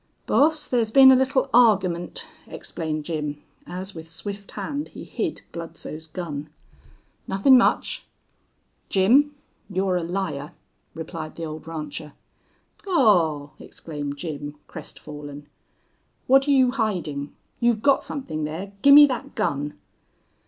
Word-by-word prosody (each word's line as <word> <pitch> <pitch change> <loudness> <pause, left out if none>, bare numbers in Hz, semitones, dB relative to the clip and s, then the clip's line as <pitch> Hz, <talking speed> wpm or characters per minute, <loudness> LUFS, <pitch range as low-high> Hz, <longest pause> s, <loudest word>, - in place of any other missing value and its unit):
"Boss, 305 0 +3
thar's 235 -3 +1
been 265 +3 +8
a - - +7
little 265 +1 +2
argyment," 190 -8 +3 0.2
explained 155 -2 -4
Jim, 150 -3 -3 0.3
as 185 +2 -6
with 160 -1 -9
swift 200 +4 -6
hand 290 +1 -4
he - - -10
hid - - -3
Bludsoe's 160 -1 -7
gun. 155 -3 -6 0.8
"Nuthin' 195 +8 +5
much." 250 - +2 0.8
"Jim, 265 +10 +4 0.3
you're 190 -1 0
a - - -1
liar," 170 -4 -3 0.4
replied 160 -1 -6
the 165 - -5
old 155 0 -8
rancher. 150 -2 -6 0.7
"Aw!" 175 - +3
exclaimed 145 -3 -6
Jim, 145 -1 -6
crestfallen. 145 -1 -9 0.8
"What're 270 +2 +4
you 260 -3 +5
hidin'?... 180 - -2 0.3
You've 235 -2 +2
got 280 -1 +4
somethin' 155 - -4
there. 165 +6 -5
Gimme 285 +1 +9
thet 270 +1 -5
gun." 145 -8 -2
180 Hz, 115 wpm, -24 LUFS, 155-245 Hz, 0.8 s, Gimme